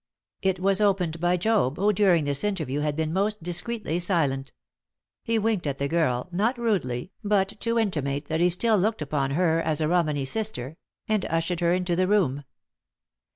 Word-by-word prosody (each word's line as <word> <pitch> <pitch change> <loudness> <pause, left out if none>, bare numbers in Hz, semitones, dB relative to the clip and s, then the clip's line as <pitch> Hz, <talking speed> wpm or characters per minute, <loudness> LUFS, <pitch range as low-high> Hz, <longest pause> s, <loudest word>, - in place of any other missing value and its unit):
It 190 -1 0
was 195 +2 +2
opened 180 -5 +1
by 175 +1 +2
Job, 185 - +1
who, 205 +2 +2
during 180 -6 +3
this 140 -1 0
interview, 160 -9 -1
had 150 -1 -1
been 160 0 -2
most 205 +1 -1
discreetly 175 +1 -2
silent. 145 -7 0 0.7
He 230 -1 0
winked 215 -6 0
at 140 -1 -2
the 140 - -1
girl 140 -5 0
not 215 +8 0
rudely, 185 - -1
but 200 -2 +2
to 230 0 -1
intimate 150 -10 -1
that 160 +2 -1
he 175 - +4
still 215 +4 +2
looked 215 -3 0
upon 140 -2 -1
her 165 -2 +2
as 155 -2 -1
a 155 - +1
Romany 155 -5 +1
sister 160 - -3 0.3
and 215 -3 +1
ushered 165 +1 -1
her 170 -1 +2
into 180 -1 0
the 185 +1 +1
room. 150 -9 +1
175 Hz, 180 wpm, -25 LUFS, 150-205 Hz, 0.7 s, he